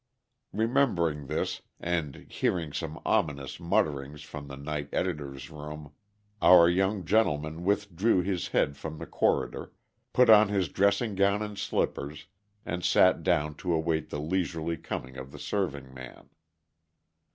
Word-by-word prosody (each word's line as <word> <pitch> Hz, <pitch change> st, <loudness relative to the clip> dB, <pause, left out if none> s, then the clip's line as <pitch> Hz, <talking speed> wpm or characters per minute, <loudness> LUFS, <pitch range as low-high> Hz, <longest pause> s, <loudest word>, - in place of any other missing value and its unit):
Remembering 95 Hz, -, +1 dB
this, -, -, -2 dB, 0.2 s
and 80 Hz, -5 st, -3 dB
hearing 80 Hz, -5 st, -1 dB
some 80 Hz, -2 st, -4 dB
ominous 70 Hz, 0 st, 0 dB
mutterings 75 Hz, -4 st, -1 dB
from 70 Hz, 0 st, -8 dB
the 70 Hz, -, -8 dB
night 75 Hz, 0 st, -4 dB
editor's 70 Hz, -7 st, -3 dB
room, 75 Hz, 0 st, -8 dB, 0.5 s
our 85 Hz, -2 st, +8 dB
young 95 Hz, +2 st, +1 dB
gentleman 80 Hz, -5 st, +1 dB
withdrew 100 Hz, 0 st, +1 dB
his 95 Hz, -2 st, -2 dB
head 70 Hz, -, +1 dB
from 80 Hz, +2 st, -7 dB
the -, -, -6 dB
corridor, -, -, 0 dB, 0.4 s
put 125 Hz, 0 st, +5 dB
on 110 Hz, -1 st, +8 dB
his 95 Hz, -5 st, 0 dB
dressing 100 Hz, +5 st, +2 dB
gown 100 Hz, +2 st, +2 dB
and 105 Hz, -1 st, -6 dB
slippers, 75 Hz, -6 st, -2 dB, 0.4 s
and 90 Hz, -1 st, -3 dB
sat 90 Hz, +1 st, +4 dB
down 75 Hz, +1 st, +1 dB
to 90 Hz, +4 st, -4 dB
await 80 Hz, -1 st, 0 dB
the 75 Hz, -, -4 dB
leisurely 80 Hz, 0 st, -1 dB
coming 65 Hz, -4 st, -6 dB
of 65 Hz, +1 st, -8 dB
the -, -, -10 dB
serving 70 Hz, -10 st, -3 dB
man. 65 Hz, -2 st, -11 dB
80 Hz, 140 wpm, -28 LUFS, 75-95 Hz, 0.5 s, our